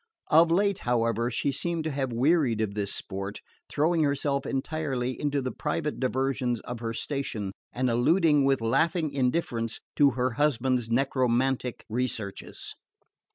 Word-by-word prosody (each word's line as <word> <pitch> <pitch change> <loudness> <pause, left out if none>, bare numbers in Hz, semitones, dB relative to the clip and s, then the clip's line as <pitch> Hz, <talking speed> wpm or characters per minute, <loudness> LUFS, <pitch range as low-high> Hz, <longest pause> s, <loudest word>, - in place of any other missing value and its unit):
Of 165 +2 +7
late, 200 +3 +2
however, 115 -1 +1
she 125 +3 0
seemed 165 +4 -2
to 155 - -2
have 135 -2 -2
wearied 130 -1 +2
of 110 -2 -1
this 100 -1 -2
sport, 100 0 -4 0.3
throwing 160 +3 +2
herself 140 -1 0
entirely 135 -3 -2
into 145 -2 0
the 130 - -2
private 150 0 -2
diversions 130 -2 0
of 120 -1 -6
her 115 -1 -3
station, 115 -5 -3 0.2
and 130 +1 0
alluding 150 +5 +3
with 135 -2 +2
laughing 160 +7 +1
indifference 125 -4 -1 0.2
to 145 -1 +6
her 125 0 +1
husband's 130 -3 +1
necromantic 130 0 +1
researches. 110 -4 -4
130 Hz, 140 wpm, -27 LUFS, 120-150 Hz, 0.3 s, Of